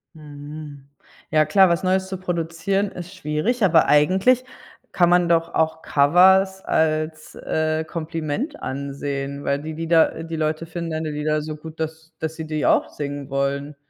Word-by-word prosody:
Mhm. 145 -1 -10 0.4
Ja 155 -1 +4
klar, 190 +4 +5
was 170 +2 0
Neues 190 0 +1
zu 190 -1 -5
produzieren 180 +3 -2
ist 180 +2 -9
schwierig, 185 +9 -1
aber 165 -4 +5
eigentlich 190 +12 +4 0.5
kann 175 -1 +3
man 175 -1 +4
doch 165 -1 +1
auch 160 0 +1
Covers 190 +6 +4
als, 155 0 -1
äh, 155 0 -1
Kompliment 165 - -4
ansehen, 140 0 -4
weil 140 0 0
die 160 0 -5
Lieder 165 0 +2
äh, 165 - -6
die 165 0 -5
Leute 155 +1 -2
finden 170 0 -5
deine 155 0 -3
Lieder 150 +1 -1
so 155 0 -5
gut, 160 +1 -11
dass 160 +1 -6
dass 160 0 -4
sie 160 - -6
die 155 -1 -1
auch - - +3
singen 145 -1 -6
wollen. 140 +1 -2
160 Hz, 165 wpm, -22 LUFS, 150-175 Hz, 0.5 s, klar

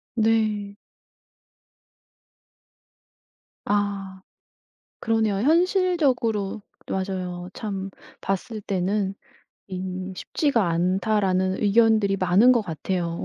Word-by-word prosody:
네. 215 -3 +1 2.9
아. 200 -2 -1 0.8
그러네요. 225 -2 +1
현실적으로 290 - +1 0.3
맞아요. 185 -2 -3
참 195 -2 -4 0.3
봤을 210 +3 -3
때는 195 +1 -1 0.5
이 185 0 -5
"쉽지가 230 - 0
않다."라는 185 +2 +1
의견들이 215 -1 +4
많은 190 +7 +5
것 240 - +3
같아요. 170 -1 -3
200 Hz, 170 characters per minute, -24 LUFS, 185-225 Hz, 2.9 s, 많은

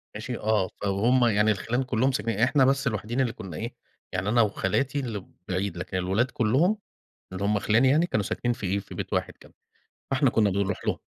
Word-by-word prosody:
ماشي 115 +3 -4
آه، 105 -3 +1
ف - - -9
وهُم 120 +6 +3
يعني 105 -1 +3
الخِلَان 115 +5 -1
كلهم 130 +1 +1
ساكنين 110 -3 -2
إحنا 135 +3 +4
بس 135 +1 +2
الوحيدين 115 +3 -1
اللي 120 -3 0
كنا 90 -5 -8
إيه، - - -5 0.4
يعني 95 +2 -1
أنا 120 +2 +4
وخالاتي 115 +6 0
اللي 110 -8 -4 0.2
بعيد 95 -1 -2
لكن 90 +1 -4
الولاد 95 +8 0
كلهم 135 - +2 0.6
اللي 95 +2 -4
هُم 105 0 +2
خِلَاني 110 +6 +3
يعني 155 +5 +4
كانوا 110 - 0
ساكنين 120 +5 -1
في 105 - -6
إيه، 100 +2 0
في - - -11
بيت - - -5
واحد - - -1
كده. - - -18 0.6
فإحنا 135 -1 +3
كنا 110 -4 +3
بنروح 100 0 -1
لهم. - - 0
110 Hz, 205 wpm, -26 LUFS, 100-130 Hz, 0.6 s, إحنا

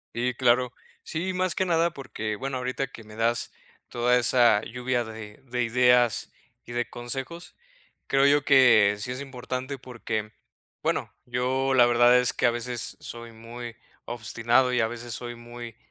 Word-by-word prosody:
Sí, 125 +1 0
claro. 125 0 +2 0.3
Sí, 180 +3 -3
más 185 0 0
que 190 - +1
nada 170 -1 +2
porque, 110 -8 -5
bueno, 135 +1 -4
ahorita 130 +2 -2
que 120 -4 -12
me 105 0 -13
das 115 +1 0 0.4
toda 120 +1 +2
esa 120 -3 +4
lluvia 125 +1 -2
de 110 0 -10
de 125 -1 -3
ideas 125 0 +3 0.3
y - - -10
de 120 0 -2
consejos, 135 +8 -6 0.5
creo 135 0 +3
yo 145 0 +4
que 115 -7 +6
sí 125 +5 -4
es 130 - -5
importante 130 0 -5
porque, 110 -4 -5 0.5
bueno, - - -1
yo 130 +2 0
la 125 -2 +6
verdad 120 +1 +5
es 125 -1 +3
que - - -1
a 120 - +5
veces 120 0 -4
soy 115 -1 -8
muy 115 +1 -9 0.3
obstinado 120 +2 +1
y 125 - +2
a 110 - +2
veces 120 0 -6
soy 120 +1 -5
muy 120 -1 -10
120 Hz, 165 wpm, -26 LUFS, 120-130 Hz, 0.5 s, que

